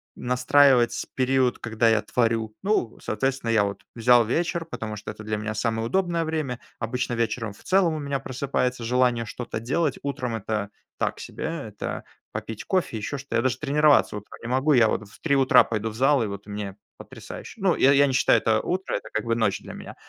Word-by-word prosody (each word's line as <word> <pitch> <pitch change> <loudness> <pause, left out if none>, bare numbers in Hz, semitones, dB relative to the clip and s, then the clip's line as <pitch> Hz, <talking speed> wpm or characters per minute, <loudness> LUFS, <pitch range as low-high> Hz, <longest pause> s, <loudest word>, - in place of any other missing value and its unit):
настраивать 125 0 +3
период, 130 -1 +2
когда 115 0 +1
я 110 -1 +3
творю. 115 -2 0
Ну, 195 - 0
соответственно, 135 0 -1
я 110 -3 +4
вот 100 0 -4
взял 120 +1 +5
вечер, 170 +7 -1
потому 110 -9 -5
что 105 - -8
это 110 - -11
для 105 0 -2
меня 110 0 -4
самое 115 +1 -1
удобное 175 0 0
время. 155 -6 -2 0.2
Обычно 120 +1 -2
вечером 115 -2 -1
в - - -19
целом 185 -4 +3
у - - -3
меня 140 -1 -2
просыпается 130 -2 -2
желание 120 -1 +2
что-то 115 0 -5
делать. 140 +5 0
Утром 125 -4 -3
это 105 -1 -3 0.3
так - - -1
себе. - - -6
Это 140 -11 -5 0.3
попить 110 -1 -6
кофе, 185 - 0
еще 125 +7 -4
что-то. 140 -2 -3
Я - - +3
даже 130 0 0
тренироваться 150 -5 +3
утром 105 - -11
не - - -5
могу. 135 +4 +2
Я 120 -4 +6
вот 110 -1 -2
в - - -18
3 140 -4 +1
утра 135 -1 +6
пойду 110 0 -2
в 110 - -9
зал, 135 0 +3
и - - -1
вот 100 0 -7
мне 100 -1 -5 0.2
потрясающе. - - -10
Ну, 190 -2 +3
я 135 - +5
я 140 0 +6
не 130 - -1
считаю, 130 - +4
это 110 -1 +2
утро, 185 +2 -2
это - - -5
как 110 - -2
бы 115 0 +1
ночь 110 -4 +1
для - - -9
меня. - - -9
125 Hz, 205 wpm, -25 LUFS, 110-140 Hz, 0.3 s, Я